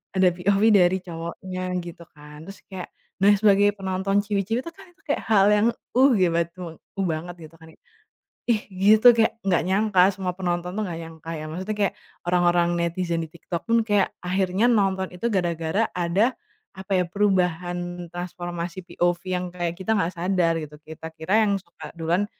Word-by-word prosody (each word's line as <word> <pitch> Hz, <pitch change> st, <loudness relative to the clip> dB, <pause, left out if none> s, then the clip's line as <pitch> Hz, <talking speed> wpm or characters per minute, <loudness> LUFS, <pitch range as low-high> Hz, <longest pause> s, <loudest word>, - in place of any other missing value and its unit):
ada 190 Hz, -1 st, +4 dB
POV, 195 Hz, +3 st, +1 dB
dari 180 Hz, 0 st, +4 dB
cowoknya 175 Hz, +2 st, -6 dB, 0.2 s
gitu 170 Hz, 0 st, -9 dB
kan. 150 Hz, 0 st, -13 dB
Terus 195 Hz, +2 st, -10 dB
kayak, 185 Hz, -2 st, -6 dB, 0.3 s
nah 205 Hz, +1 st, +6 dB
sebagai 205 Hz, -1 st, +5 dB
penonton 190 Hz, +1 st, -2 dB
ciwi-ciwi 205 Hz, +3 st, -1 dB
tuh 335 Hz, -, -7 dB
kan 390 Hz, -, -13 dB
itu 375 Hz, -, -33 dB
kayak 290 Hz, -, 0 dB
hal 200 Hz, -3 st, +5 dB
yang 210 Hz, +2 st, +3 dB, 0.3 s
"uh 270 Hz, +2 st, +7 dB
gi 185 Hz, -2 st, +4 dB
bat 170 Hz, -1 st, +1 dB
cowokku 180 Hz, +2 st, -8 dB
banget" 170 Hz, +3 st, -5 dB, 0.2 s
gitu 165 Hz, -, -21 dB
kan. 160 Hz, 0 st, -15 dB, 0.8 s
Ih 220 Hz, -3 st, +3 dB, 0.2 s
gitu 215 Hz, +4 st, +6 dB
kayak 225 Hz, -1 st, +3 dB
nggak 180 Hz, -2 st, +3 dB
nyangka 200 Hz, 0 st, +2 dB
semua 185 Hz, -2 st, -3 dB
penonton 175 Hz, -1 st, -2 dB
tuh 215 Hz, -, -2 dB
nggak 165 Hz, -2 st, -5 dB
nyangka 165 Hz, 0 st, -10 dB
ya. 155 Hz, -, -6 dB
Maksudnya 190 Hz, +5 st, -4 dB
kayak 200 Hz, -, +1 dB, 0.3 s
orang-orang 175 Hz, -1 st, +3 dB
netizen 170 Hz, 0 st, -1 dB
di 160 Hz, -, -6 dB
TikTok 170 Hz, 0 st, -6 dB
pun 230 Hz, -, +4 dB
kayak 205 Hz, -2 st, +3 dB, 0.2 s
akhirnya 185 Hz, +3 st, 0 dB
nonton 195 Hz, -5 st, +2 dB
itu 230 Hz, +6 st, -2 dB
gara-gara 175 Hz, +2 st, 0 dB
ada, 180 Hz, +8 st, +1 dB, 0.4 s
apa 190 Hz, +1 st, -11 dB
ya 180 Hz, -, +2 dB
perubahan 175 Hz, -2 st, -1 dB
transformasi 175 Hz, 0 st, -5 dB
POV 175 Hz, 0 st, 0 dB
yang 180 Hz, 0 st, -1 dB
kayak 175 Hz, -1 st, -3 dB
kita 220 Hz, +4 st, 0 dB
nggak 180 Hz, -5 st, +1 dB
sadar 180 Hz, -1 st, +1 dB
gitu. 150 Hz, -2 st, -7 dB
Kita 160 Hz, +1 st, -10 dB
kira 200 Hz, +8 st, +2 dB
yang 200 Hz, -, +2 dB
suka 170 Hz, -, -12 dB
duluan 170 Hz, +4 st, 0 dB
180 Hz, 175 wpm, -24 LUFS, 170-200 Hz, 0.8 s, uh